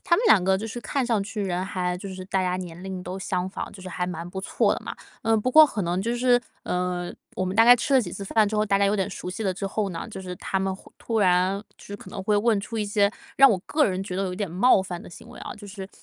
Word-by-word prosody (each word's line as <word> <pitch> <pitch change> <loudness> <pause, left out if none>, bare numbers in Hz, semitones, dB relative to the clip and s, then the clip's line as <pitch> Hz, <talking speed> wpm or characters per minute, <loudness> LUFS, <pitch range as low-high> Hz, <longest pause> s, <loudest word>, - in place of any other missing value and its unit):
他 340 - +4
们 465 - 0
两 190 -4 +6
个 190 0 +3
就 210 - -5
是 240 +2 -6
看 275 +2 -1
上 230 -3 +1
去 215 -1 -4
人 185 -1 -1
还 180 -1 -2
就 195 - -7
是 185 -1 -7
大 190 0 0
家 180 -1 0
年 175 -2 -7
龄 190 -1 -5
都 180 +1 -6
相 185 -1 -2
仿， - - -5
就 190 - -12
是 185 - -7
还 180 0 -3
蛮 175 -1 -5
不 190 - -5
错 190 - +1
的 - - -3
嘛。 - - -5 0.3
呃， 225 0 +3
不 220 +4 0
过 310 +3 +9
可 220 -7 -3
能 175 +1 -1
就 230 +4 -1
是， 245 0 +3 0.2
呃， 180 -1 -2 0.2
我 185 - -1
们 185 +1 -3
大 225 - +7
概 245 +1 +9
吃 260 +3 -2
了 265 - +6
几 180 -7 -5
次 200 - -6
饭 215 +1 +2
之 215 - -4
后， 210 0 +2
大 200 -1 +2
家 200 - +3
有 200 - +2
点 200 0 -1
熟 180 - -6
悉 190 +4 -4
了 190 - +1
之 195 +2 -4
后 200 +1 -1
呢， 170 -3 -5
就 190 -3 -8
是 180 -1 -6
他 190 +2 -2
们 190 0 -1
会 - - -16
突 225 -1 -2
然， 185 0 +3 0.2
就 - - -16
是 205 - -6
可 - - -13
能 195 - -6
会 210 +2 +2
问 215 0 +3
出 225 +2 -5
一 210 - 0
些 205 0 +2 0.3
让 275 0 +8
我 200 - +1
个 300 0 +2
人 185 -5 0
觉 185 - -5
得 190 - -1
有 180 - -3
点 200 0 -3
冒 195 +6 +4
犯 180 -2 -6
的 - - -12
行 - - -13
为 - - -12
啊。 - - -6
就 210 - -11
是 195 -1 -8
195 Hz, 335 characters per minute, -25 LUFS, 185-220 Hz, 0.3 s, 过